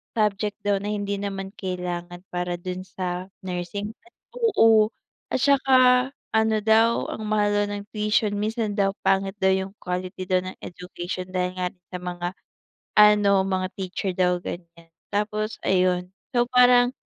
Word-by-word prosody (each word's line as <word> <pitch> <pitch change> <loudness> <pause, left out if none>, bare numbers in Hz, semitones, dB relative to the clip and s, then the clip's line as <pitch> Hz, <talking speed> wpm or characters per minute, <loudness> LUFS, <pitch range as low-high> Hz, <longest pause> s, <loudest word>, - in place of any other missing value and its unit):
subject 210 -1 0
daw 205 0 +3
na 205 +1 -3
hindi 205 -1 -2
naman 195 -1 -4
kailangan 180 -3 -5
para 175 0 -1
dun 185 +1 -5
sa 180 0 -4 0.2
nursing. 185 +4 -4 0.4
Oo, 225 - +4 0.4
at - - +1
'tsaka 260 -2 +5 0.2
ano 220 0 +3
daw, 225 +2 +3
ang 220 - -5
mahal 210 -1 +2
daw 205 0 +2
ng 205 - -6
tuition, 210 0 +1
minsan 220 0 -1
daw 195 -1 +1
pangit 195 0 +1
daw 190 0 +4
yung 190 0 -1
quality 180 0 -4
daw 185 0 +3
ng 185 0 -7
education 180 0 -6
dahil 180 -1 0
nga 180 0 0
rin 180 - -34
sa 180 - -4
mga, 175 -1 -4 0.7
ano, 205 -2 +6
mga 190 -1 -1
teacher 190 0 -3
daw, 180 -1 +2
ganyan. 170 -1 -9 0.2
Tapos 210 +1 -1
ayun. 180 -1 +2 0.2
So 240 0 +3
parang. 245 0 +6
195 Hz, 150 wpm, -24 LUFS, 180-215 Hz, 0.7 s, ano